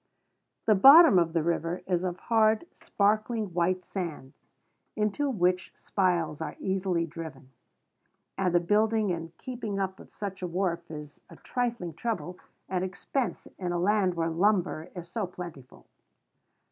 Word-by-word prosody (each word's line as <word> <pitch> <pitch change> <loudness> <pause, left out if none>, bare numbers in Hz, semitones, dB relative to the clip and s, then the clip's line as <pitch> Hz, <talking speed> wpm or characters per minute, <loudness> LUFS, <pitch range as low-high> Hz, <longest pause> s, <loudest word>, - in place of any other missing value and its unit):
The 220 - +5
bottom 275 - +9
of 165 -1 0
the 165 -2 +1
river 170 +1 -1
is 180 -1 0
of 180 -1 -2
hard, 220 - +2
sparkling 215 0 0
white 180 +1 0
sand, 160 -8 -5 0.6
into 215 +7 0
which 180 -6 +1
spiles 170 -6 0
are 150 -2 -4
easily 190 -3 0
driven; 155 -5 -9 0.8
and 185 -2 +1
the - - +6
building 210 +3 +2
and 165 -1 -5
keeping 230 -6 -5
up 190 -1 -2
of - - -14
such 195 -2 -6
a 180 - -2
wharf 170 -1 -2
is 150 -2 -9
a - - -12
trifling 235 -9 -3
trouble 185 -1 -4 0.3
and 185 -1 -1
expense 190 +3 -3
in 180 -2 -2
a - - 0
land 190 0 +2
where 165 -1 0
lumber 180 -2 +1
is 175 -1 -7
so 200 +2 -3
plentiful. 170 -8 -10
185 Hz, 145 wpm, -28 LUFS, 170-210 Hz, 0.8 s, bottom